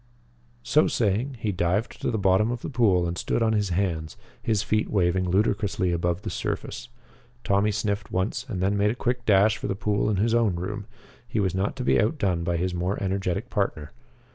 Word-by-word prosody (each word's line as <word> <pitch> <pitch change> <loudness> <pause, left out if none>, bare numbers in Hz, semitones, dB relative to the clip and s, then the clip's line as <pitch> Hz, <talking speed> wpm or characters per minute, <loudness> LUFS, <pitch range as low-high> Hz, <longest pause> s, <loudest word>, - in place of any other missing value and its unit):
So 155 - +3
saying, 115 +5 0
he 105 - 0
dived 90 +5 -1
to - - 0
the 110 - 0
bottom 95 +2 +3
of 120 -1 -4
the - - -4
pool 100 -9 +3
and 85 - -3
stood 115 - 0
on 110 -1 +2
his 105 -2 +1
hands, 85 -4 -2 0.2
his 105 -3 0
feet 110 +1 0
waving 90 -2 +1
ludicrously 100 -1 +1
above 85 +2 -1
the - - -4
surface. - - -4 0.5
Tommy 100 +1 +2
sniffed 105 0 -2
once 95 +6 -1
and 95 -5 -2
then 100 +2 +2
made 100 +1 +2
a 110 - -1
quick 125 0 -2
dash 105 +1 +5
for - - -4
the 95 - -1
pool 105 +1 0
in 105 - +1
his 110 +4 +1
own 115 -6 +2
room. 105 +4 -5 0.4
He 110 - -2
was 95 -3 +1
not 95 +2 -1
to 130 - -4
be 120 - +3
outdone 100 - 0
by 85 0 0
his 90 +1 -1
more 90 +3 -1
energetic 95 +3 -2
partner. 80 -8 -2
100 Hz, 205 wpm, -25 LUFS, 90-110 Hz, 0.5 s, dash